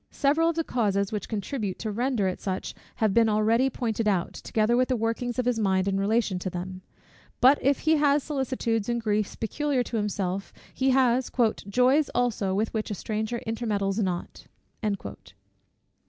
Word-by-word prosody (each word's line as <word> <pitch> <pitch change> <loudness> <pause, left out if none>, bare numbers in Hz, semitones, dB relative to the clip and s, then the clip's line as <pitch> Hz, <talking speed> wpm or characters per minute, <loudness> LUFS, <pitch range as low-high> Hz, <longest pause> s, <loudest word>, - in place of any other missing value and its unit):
Several 305 +4 +2
of 335 - -1
the 330 - 0
causes 200 -7 0
which 210 -3 -4
contribute 210 -1 -3
to 220 - -4
render 235 -2 0
it 185 - -3
such 190 -1 -3 0.2
have 215 -3 +1
been 230 0 +4
already 225 +5 +3
pointed 230 -3 -2
out, 185 -4 +1
together 220 +2 0
with 255 +1 +3
the 255 - +1
workings 230 +2 -2
of 250 - 0
his 245 -2 +1
mind 190 -2 +1
in 195 0 +1
relation 205 -2 +1
to 185 - -3
them: 185 +1 -6 0.6
but 265 +3 +6
if 275 +1 +2
he 315 0 +3
has 290 -1 +3
solicitudes 260 -6 -1
and 235 0 0
griefs 210 -2 -1
peculiar 275 +3 -1
to 235 - -4
himself, 195 -2 -2 0.2
he 265 0 +1
has 255 -1 +3 0.4
"joys 255 +6 +3
also 220 -6 0
with 215 +3 -1
which 220 0 -2
a 205 - -3
stranger 220 +4 -3
intermeddles 215 -3 -1
not." 180 -4 -3
225 Hz, 170 wpm, -26 LUFS, 200-255 Hz, 0.6 s, but